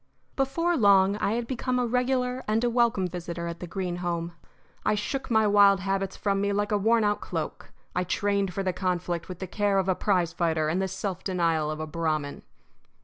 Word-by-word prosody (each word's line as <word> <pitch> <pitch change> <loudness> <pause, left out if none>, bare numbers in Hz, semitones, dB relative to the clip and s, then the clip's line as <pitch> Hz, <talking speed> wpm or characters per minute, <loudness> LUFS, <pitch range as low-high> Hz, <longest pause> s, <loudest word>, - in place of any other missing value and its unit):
Before 335 +6 +1
long 200 -5 +5
I 210 - 0
had 235 +1 -1
become 255 +1 -2
a 250 - +1
regular 250 +1 0
and 220 +2 +1
a 240 - +2
welcome 235 -5 +2
visitor 170 -1 -5
at 170 0 -5
the 180 - -6
Greene 180 0 -3
home. 170 -1 -2 0.5
I - - +2
shook 265 +7 -3
my 220 -2 +4
wild 200 -2 +5
habits 195 0 -2
from 195 -1 0
me 200 0 +1
like 205 +1 -1
a 210 - +3
worn 225 +2 +3
out 205 0 +1
cloak. - - -5 0.2
I 180 - +1
trained 200 +1 0
for 195 +2 -3
the 185 -1 0
conflict 180 -2 -2
with 180 - -6
the 190 - -5
care 200 +1 0
of 190 -1 +1
a 190 - +3
prize 180 -3 0
fighter 160 -2 0
and 175 +4 0
the 190 - 0
self 190 0 -4
denial 165 -5 0
of 155 0 -4
a 155 - -3
Brahmin. 155 -2 -2
195 Hz, 210 wpm, -27 LUFS, 175-215 Hz, 0.5 s, long